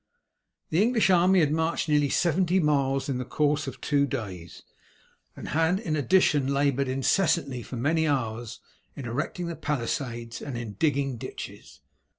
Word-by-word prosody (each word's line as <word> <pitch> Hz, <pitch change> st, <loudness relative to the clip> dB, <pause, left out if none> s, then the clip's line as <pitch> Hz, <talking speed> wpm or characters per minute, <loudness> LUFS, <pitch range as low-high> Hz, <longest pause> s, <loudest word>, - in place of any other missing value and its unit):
The 165 Hz, +4 st, +3 dB
English 225 Hz, -3 st, +3 dB
army 180 Hz, +1 st, +5 dB
had 150 Hz, -2 st, +2 dB
marched 160 Hz, +2 st, 0 dB
nearly 150 Hz, -2 st, +2 dB
seventy 180 Hz, +3 st, +2 dB
miles 140 Hz, -4 st, +1 dB
in 130 Hz, -3 st, -2 dB
the -, -, -2 dB
course 145 Hz, +3 st, 0 dB
of 135 Hz, -, -6 dB
two 140 Hz, -1 st, +1 dB
days, 95 Hz, -, -6 dB, 0.7 s
and -, -, -8 dB
had 165 Hz, +4 st, +2 dB
in 165 Hz, -8 st, -2 dB
addition 145 Hz, -3 st, +3 dB
laboured 140 Hz, -1 st, +1 dB
incessantly 135 Hz, 0 st, +1 dB
for 125 Hz, -, -8 dB
many 160 Hz, +6 st, +1 dB
hours 120 Hz, -4 st, -2 dB, 0.4 s
in 135 Hz, -, -7 dB
erecting 145 Hz, +9 st, -3 dB
the 170 Hz, -1 st, -4 dB
palisades 120 Hz, -4 st, -3 dB
and 135 Hz, -4 st, -5 dB
in 115 Hz, -3 st, -6 dB
digging 140 Hz, -, 0 dB
ditches. -, -, -9 dB
145 Hz, 155 wpm, -27 LUFS, 125-160 Hz, 0.7 s, army